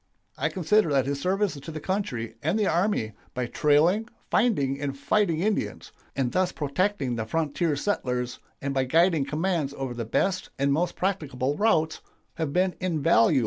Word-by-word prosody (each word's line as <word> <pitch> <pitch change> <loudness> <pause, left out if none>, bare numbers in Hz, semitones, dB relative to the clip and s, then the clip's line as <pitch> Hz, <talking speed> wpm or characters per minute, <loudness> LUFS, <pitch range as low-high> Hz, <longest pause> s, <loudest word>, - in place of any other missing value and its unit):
I - - 0
consider 190 0 +2
that 135 -2 +3
his 140 0 -2
services 190 -4 0
to 160 - -7
the 155 - -5
country 145 - -2
and 160 +7 +1
the 215 - +2
army 175 - +1 0.2
by 125 -1 -1
trailing, 160 - +3 0.2
finding, 140 - +2
and 140 -1 -3
fighting 170 0 +1
Indians, 210 +2 -1 0.2
and 130 -3 0
thus 185 0 +1
protecting 145 - -1
the 110 - -2
frontier 160 +2 0
settlers, 125 -8 -2 0.2
and 140 0 -1
by 135 -1 +1
guiding 165 +1 +3
commands 150 -1 -1
over 135 -2 -3
the 120 -1 -4
best 185 - 0
and 140 +1 +2
most 175 +4 0
practicable 145 -8 -1
routes, 160 -6 +2 0.4
have 160 -3 -1
been 180 +3 +2
invaluable." 155 -9 +3
155 Hz, 165 wpm, -26 LUFS, 135-185 Hz, 0.4 s, that